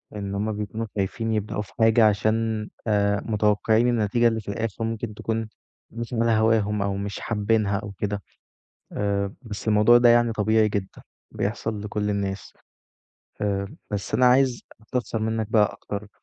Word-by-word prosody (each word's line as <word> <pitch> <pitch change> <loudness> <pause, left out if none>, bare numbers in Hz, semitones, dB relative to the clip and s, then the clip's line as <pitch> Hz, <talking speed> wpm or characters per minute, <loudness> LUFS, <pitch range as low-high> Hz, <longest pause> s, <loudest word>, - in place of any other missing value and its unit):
إن 100 -1 -4
هُم 105 +2 -1
بيكونوا 105 +2 -4
خايفين 110 +3 -2
يبدؤوا 105 0 -2
في 105 - -11
حاجة 110 0 +5
عشان 110 +1 0 0.2
آآ، 100 -1 +2
متوقعين 110 +2 +2
النتيجة 120 0 +2
اللي 115 -1 0
في - - -22
الآخر 115 +1 -3
ممكن 115 0 -3
تكون 110 +1 -3 0.4
مش 115 +1 -6
على 115 0 +2
هواهم، 110 -2 +2
أو 100 0 -1
مش 100 0 -4
حابينها 105 -2 0
أو 105 0 -7
كده. 100 +1 -3 0.7
آآ، 100 -1 -1
بس 110 -3 -7
الموضوع 105 +3 +6
ده 120 0 +6
يعني 120 0 +4
طبيعي 110 0 +2
جدًا، 100 -2 -4 0.3
بيحصل 105 0 -3
لكُل 105 0 -2
الناس، 100 -1 -3 0.9
آآ، 100 -1 -1 0.2
بس 100 -2 -3
أنا 125 - +4
عايز 125 -1 +3 0.2
أستفسر 115 0 -3
منَّك 110 0 -1
بقى 105 -3 +3
أكتر، 105 0 -7
105 Hz, 155 wpm, -24 LUFS, 100-115 Hz, 0.9 s, الموضوع